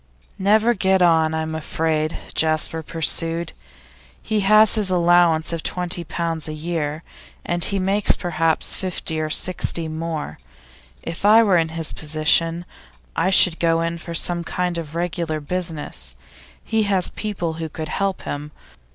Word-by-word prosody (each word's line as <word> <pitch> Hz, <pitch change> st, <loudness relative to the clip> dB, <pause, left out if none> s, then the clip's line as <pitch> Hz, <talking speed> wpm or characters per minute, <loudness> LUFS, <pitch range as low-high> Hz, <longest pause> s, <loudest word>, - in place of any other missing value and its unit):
'Never 215 Hz, +4 st, +3 dB
get 190 Hz, -3 st, +2 dB
on, 160 Hz, -2 st, +3 dB
I'm 160 Hz, 0 st, -3 dB
afraid,' 160 Hz, 0 st, -1 dB, 0.2 s
Jasper 160 Hz, 0 st, +1 dB
pursued. 165 Hz, +1 st, +2 dB, 0.7 s
'He 220 Hz, -1 st, -2 dB
has 215 Hz, +2 st, +5 dB
his 210 Hz, -3 st, +1 dB
allowance 175 Hz, -2 st, +3 dB
of 165 Hz, -, -3 dB
twenty 180 Hz, 0 st, -3 dB
pounds 165 Hz, -1 st, -3 dB
a 155 Hz, -, -5 dB
year, 155 Hz, -1 st, -3 dB, 0.4 s
and 175 Hz, 0 st, -2 dB, 0.2 s
makes 195 Hz, +2 st, +3 dB
perhaps 165 Hz, -2 st, +1 dB
fifty 175 Hz, -4 st, -2 dB
or 155 Hz, -, -2 dB
sixty 170 Hz, -1 st, +1 dB
more. 160 Hz, -, -5 dB, 0.6 s
If 165 Hz, +2 st, -6 dB
I 220 Hz, +3 st, +7 dB
were 195 Hz, -5 st, +3 dB
in 165 Hz, -1 st, 0 dB
his 165 Hz, -1 st, -2 dB
position, 160 Hz, +2 st, 0 dB, 0.5 s
I 175 Hz, +3 st, +1 dB
should 180 Hz, -3 st, +4 dB
go 165 Hz, -1 st, +2 dB
in 165 Hz, 0 st, -3 dB
for 170 Hz, 0 st, -7 dB
some 170 Hz, +1 st, +1 dB
kind 180 Hz, 0 st, -2 dB
of 160 Hz, -1 st, -8 dB
regular 170 Hz, -2 st, -2 dB
business; 150 Hz, -, -4 dB, 0.5 s
he 220 Hz, -1 st, 0 dB
has 190 Hz, -3 st, +2 dB
people 190 Hz, -6 st, -4 dB
who 160 Hz, -, -4 dB
could 155 Hz, 0 st, -6 dB
help 195 Hz, +1 st, -2 dB
him. 145 Hz, +1 st, -5 dB
165 Hz, 145 wpm, -21 LUFS, 160-180 Hz, 0.7 s, I